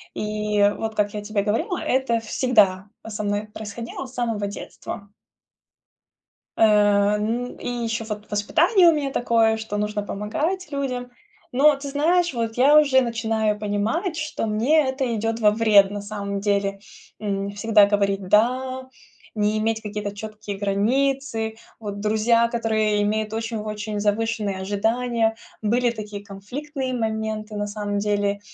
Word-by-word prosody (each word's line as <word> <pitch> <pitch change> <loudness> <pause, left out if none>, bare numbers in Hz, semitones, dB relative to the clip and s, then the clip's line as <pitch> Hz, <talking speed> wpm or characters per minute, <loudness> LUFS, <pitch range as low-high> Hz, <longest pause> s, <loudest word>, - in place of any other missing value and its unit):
И 210 0 -1 0.2
вот, 220 -1 -4
как 205 -1 0
я 210 - -4
тебе 205 -1 -1
говорила, 225 - 0
это 255 -3 +1
всегда, 210 -4 +2
а, - - -8
со 215 -1 -4
мной 205 +1 -1
происходило 230 +4 -6
с 255 - -13
самого 230 -5 -1
детства. 200 0 -8 1.5
Э, 205 -1 +4
н 230 +4 -2
и - - -7
еще 230 -2 -2
вот 210 -1 -7
воспитание 340 - +4
у - - +4
меня 285 -3 -1
такое, 230 -3 +2
что 220 -2 -4
нужно 210 0 -1
помогать 300 - -3
людям. 255 -3 -3 0.4
Но 290 +4 +5
ты 280 +1 -7
знаешь, 335 +4 +2
вот 230 -2 -2
я 285 +4 +6
уже 275 -3 +4
начинаю 225 -3 0
понимать, 215 - -1
что 305 -6 -3
мне 265 +8 +3
это 260 -2 -1
идет 225 +1 -1
во 210 -2 +5
вред 210 -3 +5
на 205 0 -4
самом 200 -1 -4
деле. 200 -1 0 0.4
М, 200 -1 -2
всегда 210 0 +4
говорить 200 -2 0
"да", 255 +5 +1 0.5
не 210 0 +1
иметь 220 +1 0
какие-то 210 -1 -5
четкие 210 -1 -7
границы, 225 +3 0 0.2
вот 205 -2 -6
друзья, 220 +2 +3
которые 220 -3 +1
имеют 215 +1 -1
очень-очень 215 -2 -3
завышенные 210 -1 0
ожидания. 225 +3 0 0.3
Были 240 +3 +2
такие 210 -3 -7
конфликтные 255 +7 -5
моменты 220 -2 -3
на 205 0 -2
самом 205 -1 -3
деле 205 -1 0
220 Hz, 145 wpm, -23 LUFS, 205-245 Hz, 1.5 s, я